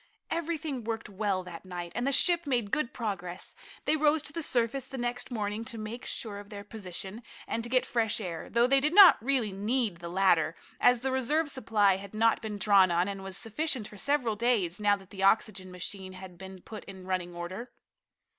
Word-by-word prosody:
Everything 320 Hz, -6 st, -2 dB
worked 225 Hz, -1 st, -4 dB
well 195 Hz, -2 st, -1 dB
that 175 Hz, -2 st, -9 dB
night, 175 Hz, -2 st, -6 dB
and 245 Hz, +4 st, -1 dB
the -, -, +2 dB
ship 340 Hz, +3 st, +5 dB
made 240 Hz, -7 st, 0 dB
good 305 Hz, -5 st, 0 dB
progress. 190 Hz, -6 st, -4 dB, 0.3 s
They 310 Hz, -, +3 dB
rose 305 Hz, 0 st, +3 dB
to 295 Hz, -, -7 dB
the 330 Hz, -, -3 dB
surface 250 Hz, -1 st, 0 dB
the 270 Hz, -, -7 dB
next 245 Hz, +1 st, -2 dB
morning 215 Hz, -2 st, -3 dB
to 230 Hz, -, -6 dB
make 220 Hz, +3 st, -6 dB
sure 205 Hz, -3 st, -3 dB
of 205 Hz, 0 st, -12 dB
their 205 Hz, -1 st, -8 dB
position, 205 Hz, 0 st, -7 dB, 0.3 s
and 230 Hz, -, -2 dB
to 235 Hz, -, -5 dB
get 255 Hz, 0 st, +3 dB
fresh 225 Hz, -2 st, 0 dB
air, 175 Hz, -6 st, -5 dB
though 235 Hz, +1 st, +4 dB
they 275 Hz, +2 st, +5 dB
did 300 Hz, +5 st, 0 dB
not 390 Hz, -, +9 dB
really 255 Hz, -5 st, +1 dB
need 210 Hz, 0 st, -1 dB
the 170 Hz, 0 st, -7 dB
latter, 175 Hz, -3 st, +3 dB, 0.2 s
as 245 Hz, -1 st, +4 dB
the 265 Hz, +1 st, -1 dB
reserve 290 Hz, +5 st, +1 dB
supply 210 Hz, -7 st, +2 dB
had 200 Hz, +1 st, -10 dB
not 225 Hz, +1 st, +3 dB
been 215 Hz, -2 st, -5 dB
drawn 200 Hz, -2 st, +5 dB
on, 175 Hz, +2 st, +2 dB
and 195 Hz, -1 st, -5 dB
was 190 Hz, -1 st, -5 dB
sufficient 245 Hz, -1 st, -1 dB
for 210 Hz, -, -13 dB
several 260 Hz, -5 st, +1 dB
days, 210 Hz, -5 st, +1 dB
now 205 Hz, -1 st, +4 dB
that 195 Hz, -1 st, -15 dB
the 190 Hz, -, -7 dB
oxygen 195 Hz, -1 st, +2 dB
machine 185 Hz, +1 st, -6 dB
had 185 Hz, -1 st, -10 dB
been 190 Hz, +1 st, -10 dB
put 215 Hz, -, -9 dB
in 190 Hz, -2 st, -10 dB
running 180 Hz, -2 st, -3 dB
order. 185 Hz, +8 st, -6 dB
215 Hz, 210 wpm, -29 LUFS, 190-250 Hz, 0.3 s, not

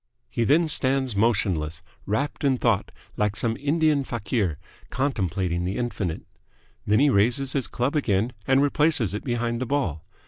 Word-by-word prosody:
He 115 Hz, -, 0 dB
then 160 Hz, +6 st, +4 dB
stands 130 Hz, -5 st, +1 dB
motionless, 90 Hz, -8 st, 0 dB, 0.2 s
wrapped 140 Hz, +11 st, -2 dB
in 135 Hz, -2 st, +3 dB
thought, -, -, +1 dB, 0.3 s
like 105 Hz, 0 st, 0 dB
some 115 Hz, 0 st, 0 dB
Indian 150 Hz, 0 st, +2 dB
fakir 110 Hz, -, -2 dB, 0.3 s
contemplating 95 Hz, -, -1 dB
the 95 Hz, +3 st, -2 dB
infinite. 105 Hz, -9 st, -3 dB, 0.6 s
Then 105 Hz, +1 st, +4 dB
he 140 Hz, +3 st, +4 dB
raises 125 Hz, +6 st, +2 dB
his 135 Hz, -4 st, -1 dB
club 125 Hz, +5 st, -2 dB
again 115 Hz, -4 st, +1 dB
and 135 Hz, +1 st, +4 dB
replaces 145 Hz, -, +2 dB
it 105 Hz, -, -4 dB
behind 120 Hz, -1 st, -2 dB
the 130 Hz, -, -2 dB
ball. 115 Hz, -, -1 dB
120 Hz, 150 wpm, -25 LUFS, 100-140 Hz, 0.6 s, then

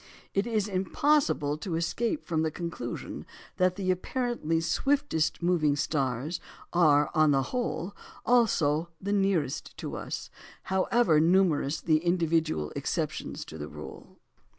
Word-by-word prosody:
It 195 Hz, +3 st, +1 dB
is 215 Hz, -3 st, 0 dB
impossible 190 Hz, -, +1 dB
to 165 Hz, +1 st, -3 dB
escape 230 Hz, -, -1 dB
from 160 Hz, -2 st, 0 dB
the 160 Hz, -, +1 dB
conclusion 165 Hz, -7 st, -5 dB, 0.3 s
that 185 Hz, 0 st, +3 dB
the 185 Hz, -1 st, 0 dB
apparently 185 Hz, -4 st, -1 dB
swiftest 175 Hz, -, 0 dB
moving 165 Hz, -5 st, +3 dB
stars 140 Hz, +1 st, -1 dB, 0.3 s
are, 150 Hz, -4 st, +4 dB
on 155 Hz, -2 st, +4 dB
the 135 Hz, -2 st, +3 dB
whole, 205 Hz, -7 st, -2 dB, 0.3 s
also 170 Hz, -10 st, +3 dB
the 200 Hz, +2 st, -2 dB
nearest 195 Hz, -9 st, 0 dB
to -, -, -5 dB
us, -, -, -5 dB, 0.4 s
however 190 Hz, -3 st, +3 dB
numerous 165 Hz, -3 st, +3 dB
the 155 Hz, -2 st, +3 dB
individual 165 Hz, -, +1 dB
exceptions -, -, -3 dB
to 80 Hz, -, -10 dB
the 75 Hz, -, -5 dB
rule. -, -, -10 dB
170 Hz, 130 wpm, -28 LUFS, 155-195 Hz, 0.4 s, are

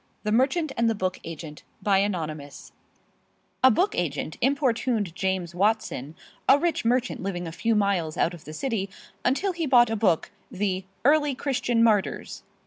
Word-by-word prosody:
THE 210 Hz, -, -1 dB
MERCHANT 270 Hz, +7 st, +2 dB
AND 230 Hz, 0 st, +3 dB
THE 225 Hz, -, 0 dB
BOOK 185 Hz, -2 st, -2 dB
AGENT 160 Hz, -2 st, -8 dB, 0.2 s
ANONYMOUS 170 Hz, -8 st, -1 dB, 0.9 s
A 260 Hz, -, +9 dB
book 365 Hz, -, +2 dB
agent -, -, -2 dB
importuned 245 Hz, -, +1 dB
James 190 Hz, -2 st, -2 dB
Watson, 180 Hz, -, 0 dB, 0.3 s
a 275 Hz, -, +8 dB
rich 340 Hz, +3 st, 0 dB
merchant 245 Hz, +2 st, 0 dB
living 180 Hz, -2 st, -3 dB
a 165 Hz, -, -5 dB
few 225 Hz, +7 st, 0 dB
miles 195 Hz, -6 st, 0 dB
out 170 Hz, -, +1 dB
of 170 Hz, -, -12 dB
the 155 Hz, -, -8 dB
city, 210 Hz, -, -2 dB, 0.3 s
until 285 Hz, +10 st, +1 dB
he 335 Hz, -3 st, -2 dB
bought 240 Hz, -3 st, +5 dB
a -, -, 0 dB
book, 185 Hz, -7 st, +1 dB, 0.2 s
the 190 Hz, -1 st, -2 dB, 0.2 s
"Early 295 Hz, -1 st, +4 dB
Christian 245 Hz, -4 st, +1 dB
Martyrs." 210 Hz, -4 st, +1 dB
210 Hz, 155 wpm, -26 LUFS, 180-255 Hz, 0.9 s, A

